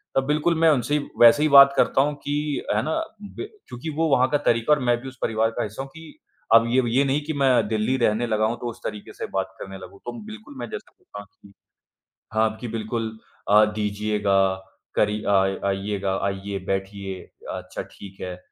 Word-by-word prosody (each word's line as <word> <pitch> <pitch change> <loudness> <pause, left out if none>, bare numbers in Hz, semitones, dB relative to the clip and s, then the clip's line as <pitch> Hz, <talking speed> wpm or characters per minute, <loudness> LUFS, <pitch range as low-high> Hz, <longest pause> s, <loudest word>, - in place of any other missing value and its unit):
तब 135 - +2
बिल्कुल 155 +3 +2
मैं 165 -1 +5
उनसे 145 +2 +1 0.2
वैसे 120 +6 +8
ही 155 - +3
बात 140 0 +9
करता 135 - +4
हूँ 145 +1 0
कि 145 0 -2
है 105 - +2
ना, 160 - -1 0.3
ब 210 - -7 0.2
क्योंकि 125 +6 -6
वो 165 - +2
वहाँ 130 -1 +4
का 145 - +2
तरीक़ा 115 0 +2
है 150 - +3
और - - -4
मैं 120 0 +3
भी 135 - -8
उस 130 0 -10
परिवार 110 0 +1
का - - +1
हिस्सा 105 +5 -5
हूँ, 135 - -10
कि 160 -1 -13 0.3
अब 115 0 +7
ये 125 +3 +3
ये 140 - +5
नहीं 140 +2 +1
कि 155 - -2
मैं 130 -6 +3
दिल्ली 110 +5 0
रहने 120 0 +1
लगा 110 -1 +1
हूँ, 115 +2 -1
तो 120 - -3
उस 120 0 -9
तरीक़े 105 - -6
से - - -5
बात - - -2
करने 95 0 -7
लगूँ, 95 +1 -12
तो 120 - -4
बिल्कुल 220 -9 -10
मैं 120 -2 -6
जैसा - - -8
बोलता 105 - -11
हूँ 100 - -15
कि 100 - -17 0.8
हाँ 110 0 +3
अब 110 - -9
कि 120 - -5
बिल्कुल 110 0 -3 0.4
अ, 105 +1 +7
दीजिएगा, 105 -2 +1 0.4
करी 105 0 +1
अ, - - 0 0.4
आइएगा, 100 0 -1
आइए, 100 0 -3
बैठिए, 95 0 -3 0.4
अच्छा - - -6
ठीक 95 -1 -13
है। 90 -1 -5
115 Hz, 215 wpm, -24 LUFS, 105-140 Hz, 0.8 s, बात